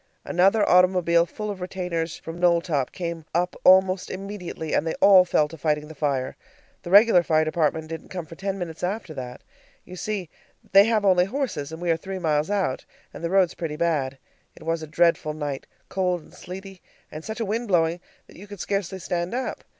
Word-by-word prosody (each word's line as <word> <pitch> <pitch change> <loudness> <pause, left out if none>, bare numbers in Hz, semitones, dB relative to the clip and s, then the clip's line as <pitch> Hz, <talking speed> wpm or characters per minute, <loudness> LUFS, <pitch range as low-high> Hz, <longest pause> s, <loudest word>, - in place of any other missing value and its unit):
Another 195 +4 +3
automobile 180 -2 +4
full 210 +3 -5
of 190 -2 -8
retainers 180 -3 -3
from 165 +1 -8
Knowltop 170 -6 +2
came 170 -2 -5
up 180 +1 0
almost 185 0 +5
immediately, 185 -5 -6
and - - +1
they 160 - -1
all 190 -2 +7
fell 155 -4 +2
to 165 +1 -12
fighting 150 -1 0
the 160 - -10
fire. 140 -4 -1 0.5
The - - -8
regular 205 -1 +7
fire 155 -2 +2
department 155 0 0
didn't 165 0 -7
come 180 -3 -5
for 160 - -12
ten 195 +3 -4
minutes 170 -3 -6
after 185 -2 -3
that. 125 -3 -8 0.4
You 185 - -10
see, 190 -3 -4 0.4
they 195 +1 +8
have 220 -2 +1
only 180 -2 +5
horses, 195 - -3
and 160 - -7
we 175 -1 0
are 165 - +2
three 190 +3 -6
miles 155 -2 0
out, 195 -10 -1 0.3
and - - -10
the 170 - -1
roads 190 -2 +3
pretty 160 -3 -4
bad. 150 -5 0 0.4
It - - -14
was 165 0 -1
a 155 - -7
dreadful 165 -1 +2
night, 145 -3 -4 0.2
cold 180 -3 -1
and - - -19
sleety, 190 +1 -10 0.3
and 155 +1 -8
such 220 +4 -6
a 225 - -1
wind 225 +4 -2
blowing 170 -2 +2 0.3
that - - -17
you 200 +4 -11
could 205 -1 -10
scarcely 195 0 -2
stand 175 +2 -3
up. 260 - -4
175 Hz, 200 wpm, -24 LUFS, 160-190 Hz, 0.5 s, they